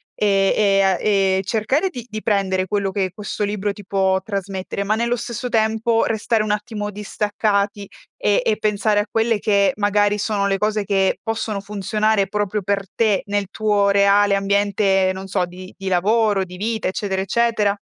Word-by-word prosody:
ehm, 195 Hz, -2 st, +2 dB
e 200 Hz, -2 st, +3 dB
a 190 Hz, -2 st, +3 dB
e 195 Hz, -2 st, +2 dB
cercare 240 Hz, -, 0 dB
di 245 Hz, -8 st, -8 dB
di 215 Hz, 0 st, -5 dB
prendere 190 Hz, -3 st, +1 dB
quello 200 Hz, 0 st, -1 dB
che 190 Hz, -2 st, -1 dB
questo 210 Hz, +1 st, -4 dB
libro 205 Hz, 0 st, -2 dB
ti 205 Hz, -1 st, -12 dB
può 190 Hz, -1 st, +1 dB
trasmettere, 195 Hz, -1 st, -4 dB
ma 210 Hz, +2 st, +1 dB
nello 235 Hz, +2 st, 0 dB
stesso 240 Hz, +1 st, -5 dB
tempo 225 Hz, +1 st, +1 dB
restare 220 Hz, 0 st, 0 dB
un 215 Hz, -, -2 dB
attimo 210 Hz, 0 st, -3 dB
distaccati 205 Hz, 0 st, -1 dB, 0.3 s
e 205 Hz, +2 st, +2 dB
e 215 Hz, -, +1 dB
pensare 210 Hz, 0 st, +1 dB
a -, -, -4 dB
quelle 225 Hz, -1 st, +1 dB
che 200 Hz, -1 st, +2 dB
magari 205 Hz, 0 st, +2 dB
sono 205 Hz, -1 st, 0 dB
le 195 Hz, 0 st, +1 dB
cose 210 Hz, +1 st, 0 dB
che 195 Hz, -1 st, +1 dB
possono 225 Hz, -2 st, -3 dB
funzionare 210 Hz, +1 st, 0 dB
proprio 205 Hz, 0 st, -2 dB
per 200 Hz, +1 st, -1 dB
te, 215 Hz, -4 st, +2 dB
nel 205 Hz, 0 st, -1 dB
tuo 205 Hz, -2 st, +1 dB
reale 200 Hz, 0 st, +4 dB
ambiente, 195 Hz, -1 st, +2 dB
non 190 Hz, +1 st, -7 dB
so, 190 Hz, -1 st, 0 dB
di 185 Hz, +1 st, -11 dB
di 195 Hz, -1 st, -7 dB
lavoro, 205 Hz, +2 st, +2 dB
di 180 Hz, -1 st, -10 dB
vita, 220 Hz, +1 st, -2 dB
eccetera, 190 Hz, 0 st, -2 dB
eccetera? 210 Hz, 0 st, +1 dB
205 Hz, 175 wpm, -20 LUFS, 195-215 Hz, 0.3 s, reale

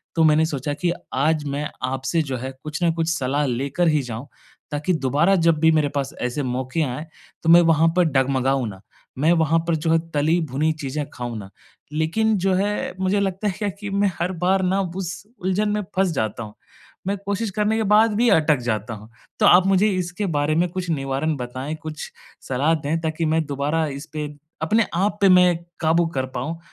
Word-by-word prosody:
तो 165 Hz, -, +3 dB
मैंने 155 Hz, 0 st, +5 dB
सोचा 145 Hz, -2 st, -3 dB
कि 170 Hz, +4 st, -1 dB, 0.2 s
आज 150 Hz, +3 st, +1 dB
मैं 145 Hz, +1 st, -3 dB
आपसे 135 Hz, +6 st, 0 dB
जो 135 Hz, -3 st, -4 dB
है 130 Hz, +2 st, -5 dB
कुछ 155 Hz, +2 st, -4 dB
न 170 Hz, -, +4 dB
कुछ 165 Hz, 0 st, -1 dB
सलाह 145 Hz, -2 st, 0 dB
लेकर 140 Hz, +7 st, 0 dB
ही 150 Hz, -2 st, +3 dB
जाऊँ। 125 Hz, +1 st, -6 dB, 0.4 s
ताकि 150 Hz, +5 st, 0 dB
दोबारा 150 Hz, +6 st, +2 dB
जब 165 Hz, -3 st, +3 dB
भी 160 Hz, +1 st, +5 dB
मेरे 155 Hz, -2 st, +2 dB
पास 140 Hz, -1 st, -3 dB
ऐसे 125 Hz, +3 st, -2 dB
मौके 130 Hz, +4 st, -2 dB
आए, 140 Hz, +2 st, -4 dB, 0.4 s
तो 160 Hz, -, +1 dB
मैं 170 Hz, +1 st, +9 dB
वहाँ 165 Hz, -1 st, +4 dB
पर 180 Hz, -, +6 dB
डगमगाऊँ 135 Hz, -3 st, +1 dB
ना। 95 Hz, -1 st, -11 dB, 0.4 s
मैं 155 Hz, +5 st, +3 dB
वहाँ 165 Hz, -1 st, +3 dB
पर 170 Hz, -, +2 dB
जो 160 Hz, +1 st, -1 dB
है 165 Hz, -, +4 dB
तली-भुनी 155 Hz, -1 st, +1 dB
चीज़ें 145 Hz, +2 st, -3 dB
खाऊँ 120 Hz, -2 st, -5 dB
ना। 95 Hz, -2 st, -9 dB, 0.4 s
लेकिन 215 Hz, +8 st, +1 dB
जो 190 Hz, +1 st, +1 dB
है 200 Hz, +2 st, -1 dB
मुझे 190 Hz, +2 st, +1 dB
लगता 195 Hz, +1 st, -1 dB
है -, -, +1 dB
क्या 210 Hz, -1 st, -1 dB
कि 205 Hz, +2 st, -7 dB
मैं 200 Hz, 0 st, +1 dB
हर 175 Hz, +2 st, 0 dB
बार 190 Hz, +1 st, +3 dB
न 185 Hz, +1 st, +1 dB, 0.2 s
उस 180 Hz, -1 st, -5 dB, 0.2 s
उलझन 190 Hz, +3 st, 0 dB
में 210 Hz, 0 st, 0 dB
फँस 190 Hz, -1 st, +2 dB
जाता 110 Hz, -3 st, -2 dB
हूँ। 105 Hz, -, -10 dB, 0.5 s
मैं 200 Hz, +1 st, 0 dB
कोशिश 200 Hz, +2 st, -1 dB
करने 210 Hz, +3 st, 0 dB
के 225 Hz, -, +1 dB
बाद 215 Hz, +2 st, +4 dB
भी 235 Hz, +3 st, +3 dB
अटक 155 Hz, -5 st, +4 dB
जाता 110 Hz, 0 st, -2 dB
हूँ। 110 Hz, +1 st, -11 dB, 0.3 s
तो -, -, +4 dB
आप 180 Hz, +1 st, +6 dB
मुझे 195 Hz, +2 st, +4 dB
इसके 185 Hz, +1 st, -2 dB
बारे 145 Hz, +2 st, +1 dB
में 175 Hz, +2 st, +2 dB
कुछ 180 Hz, 0 st, -4 dB
निवारण 140 Hz, +1 st, -1 dB
बताएँ, 130 Hz, +4 st, -5 dB
कुछ 155 Hz, -1 st, -7 dB, 0.4 s
सलाह 135 Hz, +5 st, +2 dB
दें 155 Hz, +1 st, -2 dB
ताकि 160 Hz, 0 st, -1 dB
मैं 160 Hz, 0 st, +1 dB
दोबारा 145 Hz, +3 st, -1 dB
इसपे 150 Hz, +2 st, -5 dB, 0.3 s
अपने 215 Hz, +8 st, +2 dB
आप 200 Hz, +4 st, +1 dB
पे 200 Hz, -, +6 dB
मैं 180 Hz, -1 st, +6 dB, 0.2 s
काबू 165 Hz, +1 st, +3 dB
कर 130 Hz, -1 st, 0 dB
पाऊँ 155 Hz, +7 st, -3 dB
160 Hz, 200 wpm, -22 LUFS, 140-180 Hz, 0.5 s, मैं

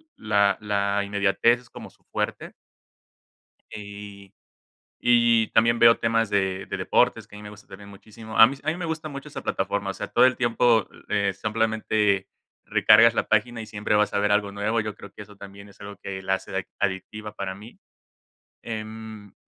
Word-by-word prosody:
la 100 Hz, -2 st, +1 dB
la 100 Hz, -1 st, 0 dB
inmediatez 100 Hz, +4 st, +2 dB
es 120 Hz, -, -22 dB
como -, -, -11 dB
su -, -, -29 dB
fuerte. -, -, -4 dB, 1.2 s
Y 100 Hz, -1 st, -10 dB, 0.7 s
y 120 Hz, -2 st, +4 dB
también 115 Hz, +1 st, +2 dB
veo 115 Hz, 0 st, +6 dB
temas 115 Hz, 0 st, +1 dB
de 95 Hz, -1 st, -1 dB
de -, -, -4 dB
deportes, -, -, +1 dB
que 105 Hz, -, -13 dB
a -, -, -10 dB
mí 105 Hz, -, -11 dB
me 105 Hz, -, -9 dB
gusta 105 Hz, 0 st, -15 dB
también 100 Hz, +1 st, -12 dB
muchísimo. 110 Hz, +2 st, -10 dB
A 110 Hz, -, +10 dB
mí 135 Hz, -, -5 dB
s 135 Hz, -, -17 dB
a 155 Hz, -, +1 dB
mí 160 Hz, -, -3 dB
me 180 Hz, -, -5 dB
gusta 160 Hz, -1 st, -4 dB
mucho 140 Hz, -2 st, -8 dB
esa -, -, -8 dB
plataforma, 100 Hz, -1 st, -2 dB
o -, -, -6 dB
sea, -, -, -6 dB
todo -, -, +4 dB
el 130 Hz, -, +1 dB
tiempo, 120 Hz, -3 st, +2 dB, 0.2 s
eh, 100 Hz, -2 st, 0 dB
simplemente 110 Hz, -2 st, 0 dB, 0.4 s
recargas 115 Hz, +2 st, +5 dB
la -, -, -1 dB
página 115 Hz, +2 st, +1 dB
y -, -, -9 dB
siempre 105 Hz, 0 st, -2 dB
vas 105 Hz, 0 st, +2 dB
a -, -, +2 dB
ver 105 Hz, 0 st, +1 dB
algo 100 Hz, -1 st, +1 dB
nuevo. 105 Hz, +3 st, -1 dB
Yo 105 Hz, -1 st, -4 dB
creo 100 Hz, -, -12 dB
que -, -, -10 dB
eso 105 Hz, 0 st, -15 dB
también 100 Hz, 0 st, -12 dB
es 100 Hz, -, -20 dB
algo 100 Hz, 0 st, -9 dB
que 95 Hz, -1 st, -6 dB
la 95 Hz, 0 st, 0 dB
hace 95 Hz, -, -7 dB
ade -, -, -3 dB
adictiva 105 Hz, +3 st, -4 dB
para 95 Hz, -2 st, -5 dB
mí. 105 Hz, +5 st, -14 dB, 0.8 s
Em 110 Hz, -2 st, -8 dB
105 Hz, 195 wpm, -24 LUFS, 100-115 Hz, 1.2 s, A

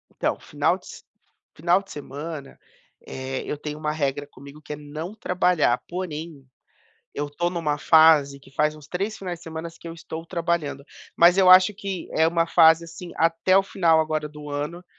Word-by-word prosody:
Então, -, -, -1 dB
final -, -, 0 dB
de -, -, -21 dB
s -, -, -11 dB, 0.5 s
final 175 Hz, +3 st, +2 dB
de 195 Hz, -, -16 dB
semana, 145 Hz, 0 st, -8 dB, 0.5 s
eh, 130 Hz, 0 st, -5 dB
eu 150 Hz, -, -4 dB
tenho 150 Hz, 0 st, -6 dB
uma 155 Hz, -1 st, -1 dB
regra 145 Hz, -2 st, -2 dB
comigo 140 Hz, +2 st, -14 dB
que 150 Hz, -, -7 dB
é -, -, -4 dB
não 150 Hz, +5 st, -7 dB
trabalhar, 180 Hz, -, +1 dB
porém, 165 Hz, -5 st, -6 dB, 0.7 s
eu 145 Hz, 0 st, -3 dB
tô 175 Hz, +4 st, -1 dB
numa 160 Hz, -4 st, -2 dB
fase 155 Hz, -3 st, +5 dB
que 135 Hz, -, -18 dB
faz 150 Hz, +2 st, 0 dB
uns 150 Hz, -2 st, -15 dB
3 200 Hz, +4 st, -3 dB
finais 180 Hz, -3 st, -6 dB
de -, -, -19 dB
semana 160 Hz, 0 st, -6 dB
que -, -, -13 dB
eu 165 Hz, -, -7 dB
estou 165 Hz, 0 st, -8 dB
trabalhando, 165 Hz, -5 st, -2 dB, 0.3 s
mas 175 Hz, +2 st, +6 dB
eu 190 Hz, -1 st, +5 dB
acho 185 Hz, +2 st, +8 dB
que 195 Hz, -2 st, -5 dB
é 160 Hz, -, +3 dB
uma 165 Hz, 0 st, +1 dB
fase, 165 Hz, -1 st, +5 dB
assim, 170 Hz, +1 st, -10 dB
até 165 Hz, +3 st, +2 dB
o 195 Hz, -, +5 dB
final 170 Hz, -5 st, +2 dB
agora 155 Hz, -1 st, -2 dB
do 150 Hz, 0 st, -10 dB
ano, 150 Hz, +5 st, -4 dB
160 Hz, 190 wpm, -24 LUFS, 150-175 Hz, 0.7 s, acho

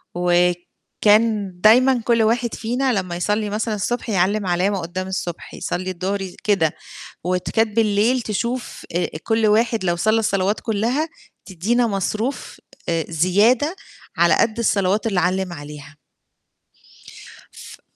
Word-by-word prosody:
وكان 180 Hz, +4 st, +1 dB
دايمًا 245 Hz, +4 st, +5 dB
كُلّ 230 Hz, -2 st, +3 dB
واحد 235 Hz, +2 st, +1 dB
فينا 250 Hz, +3 st, -1 dB
لمّا 185 Hz, -4 st, -2 dB
يصلّي 210 Hz, +4 st, -1 dB
مثلًا 215 Hz, +1 st, -2 dB
الصبح 240 Hz, +4 st, -3 dB
يعلِّم 200 Hz, +1 st, +1 dB
علامة 185 Hz, +3 st, +1 dB
قُدّام 185 Hz, +2 st, -5 dB
الصبح 180 Hz, -3 st, -5 dB
يصلي 185 Hz, +1 st, -3 dB
الضهر 190 Hz, +3 st, -3 dB, 0.2 s
كده، 190 Hz, -7 st, +1 dB, 0.5 s
وكانت 205 Hz, +5 st, 0 dB
بالليل 225 Hz, +3 st, +2 dB
تشوف 235 Hz, +3 st, -4 dB
آآ 175 Hz, -, 0 dB
كُلّ 225 Hz, -1 st, +1 dB
واحد 225 Hz, 0 st, +2 dB
لو 175 Hz, -, +1 dB
صلّى 215 Hz, +6 st, +2 dB
الصلوات 200 Hz, -2 st, 0 dB
كُلّها، 235 Hz, +8 st, -1 dB, 0.4 s
تدّينا 220 Hz, +7 st, 0 dB
مصروف 215 Hz, +5 st, -3 dB, 0.3 s
آآ، 165 Hz, -1 st, 0 dB
زيادة 205 Hz, -, +2 dB, 0.4 s
على 170 Hz, 0 st, +4 dB
قد 230 Hz, 0 st, +1 dB
الصلوات 205 Hz, -1 st, +1 dB
اللي 195 Hz, -5 st, +1 dB
علّم 185 Hz, 0 st, 0 dB
عليها. 150 Hz, 0 st, -10 dB, 1.5 s
ف -, -, -13 dB
205 Hz, 125 wpm, -21 LUFS, 180-225 Hz, 1.5 s, دايمًا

